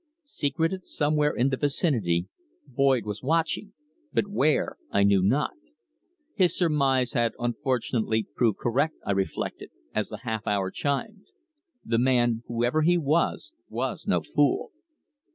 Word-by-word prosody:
Secreted 165 - -2
somewhere 150 0 +1
in 125 +3 +1
the 135 - -1
vicinity, 120 - +1 0.4
Boyd 135 -5 +2
was 105 0 -5
watching, 165 +8 0 0.4
but - - +1
where 155 -7 +1
I 100 - +2
knew 100 -1 +4
not. 125 +11 +2 0.8
His 185 -4 +2
surmise 140 -7 +2
had 120 -1 +1
unfortunately 120 -2 -1
proved 115 -5 +2
correct, 140 +7 0
I - - 0
reflected, 95 -1 -2 0.2
as - - -1
the - - -8
half 110 -1 -3
hour 100 -2 0
chimed. 195 +9 -3 0.6
The 115 - +1
man, 120 -2 +2
whoever 120 +6 +1
he 175 +3 +4
was, 165 - 0 0.2
was - - -3
no - - +2
fool. - - +1
130 Hz, 135 wpm, -26 LUFS, 115-155 Hz, 0.8 s, knew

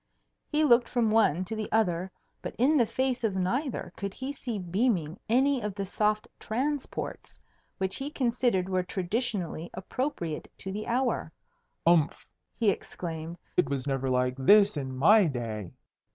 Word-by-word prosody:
He 305 0 +1
looked 240 -4 +5
from 235 -3 +1
one 185 -6 +3
to 220 - -4
the 215 -1 -4
other, 185 -4 +1 0.3
but - - -6
in 270 +7 +4
the 240 -6 +4
face 260 0 -1
of 210 -4 +1
neither 240 +9 -1
could 200 -1 -5
he 270 +2 -4
see 245 -5 -4
beaming 185 -2 0
any 265 +2 +3
of 210 -2 -3
the 200 -1 -3
soft 210 +2 0
transports 275 +5 -3 0.4
which 190 0 -1
he 275 +2 -4
considered 235 -8 +1
were 185 -1 +1
traditionally 185 -2 -2
appropriate 185 - -3
to 195 - -6
the 210 +2 -5
hour. 240 -8 0 0.5
"Umph!" 165 -3 +3 0.3
he 220 -4 +4
exclaimed; 165 -2 -6 0.2
"it 180 - +2
was 140 -2 -2
never 135 -2 -1
like 125 0 +2
this 200 +9 +6
in 135 -3 -4
my 205 +9 +6
day." 115 - -3
200 Hz, 155 wpm, -28 LUFS, 170-240 Hz, 0.5 s, this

